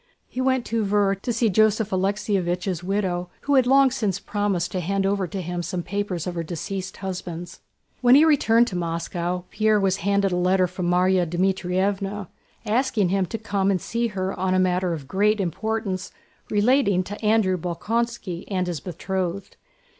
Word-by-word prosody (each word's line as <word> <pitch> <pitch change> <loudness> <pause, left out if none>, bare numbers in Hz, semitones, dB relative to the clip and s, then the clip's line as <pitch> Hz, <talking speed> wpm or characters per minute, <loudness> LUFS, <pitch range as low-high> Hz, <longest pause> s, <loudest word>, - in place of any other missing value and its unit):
He 255 - -4
went 260 -1 +1
to 230 -1 -1
Tver 200 -1 +2
to 245 - -2
see 230 0 +1
Joseph 215 +1 +2
Alexéevich's 185 -2 -1
widow, 180 -2 -1
who 285 - 0
had 260 -2 +4
long 270 0 +5
since 210 -7 -1
promised 200 -4 -1
to 185 - -2
hand 195 +3 -1
over 195 -1 0
to 185 +2 -5
him 175 +1 -3
some 175 0 -3
papers 195 -2 -3
of 180 - -3
her 170 - -2
deceased 185 +4 -5
husband's. 175 -2 -6 0.4
When 250 0 +7
he 300 +3 +7
returned 240 -7 +4
to 185 - -6
Moscow 175 +1 -2
Pierre 215 0 +2
was 195 -1 +1
handed 200 +1 +1
a - - 0
letter 185 +1 +3
from 180 0 -3
Márya 180 0 +3
Dmítrievna 190 +2 -1 0.4
asking 220 -3 +1
him 190 0 +1
to 225 - -4
come 200 -3 -1
and 190 -2 +2
see 235 +6 -1
her 190 -3 -3
on 185 0 0
a - - +3
matter 180 -1 +1
of 145 -5 -6
great 205 +7 +2
importance 195 +1 -2 0.4
relating 210 -3 +3
to 205 +4 -8
Andrew 210 -3 +3
Bolkónski 190 +2 -3
and 185 -2 -1
his 175 -4 -3
betrothed. 185 +3 -4
195 Hz, 175 wpm, -24 LUFS, 180-210 Hz, 0.4 s, When